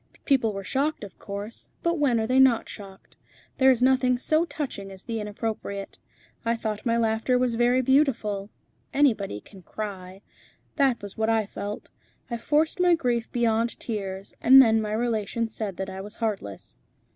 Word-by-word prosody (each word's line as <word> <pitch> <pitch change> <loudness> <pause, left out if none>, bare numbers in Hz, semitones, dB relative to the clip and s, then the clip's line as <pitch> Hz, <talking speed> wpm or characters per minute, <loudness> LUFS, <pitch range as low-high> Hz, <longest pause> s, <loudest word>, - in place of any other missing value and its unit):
People 255 -6 +3
were 195 -1 -6
shocked, 280 +6 -1
of 200 - -10
course, 205 +3 -6
but 340 -1 +1
when 255 -6 +3
are 220 - 0
they 255 +3 +2
not 260 -4 +5
shocked? 195 -2 -11 0.4
There 265 0 +6
is 250 -2 +3
nothing 255 -1 +3
so 310 +6 +2
touching 280 - -5
as 190 0 -9
the 230 -2 -3
inappropriate. 210 -1 -5 0.4
I 230 0 +1
thought 215 0 -4
my 230 0 +2
laughter 225 +2 +1
was 250 -1 +1
very 245 +2 +3
beautiful. 235 -7 +1 0.5
Anybody 215 - +2
can 195 -3 -15
cry. 190 -1 -7 0.6
That 265 -6 +2
was 205 +1 -8
what 220 0 +1
I 225 -1 +2
felt. 205 +1 -7 0.4
I 235 - -1
forced 305 +7 +1
my 355 -1 +5
grief 245 -7 -1
beyond 230 -1 0
tears, 195 -4 -5
and 265 +2 +8
then 225 -4 +6
my 210 -1 -3
relations 225 0 -1
said 205 -5 -4
that 190 - -3
I 190 0 -6
was 210 +2 -8
heartless." 200 - -4
225 Hz, 170 wpm, -26 LUFS, 205-255 Hz, 0.6 s, and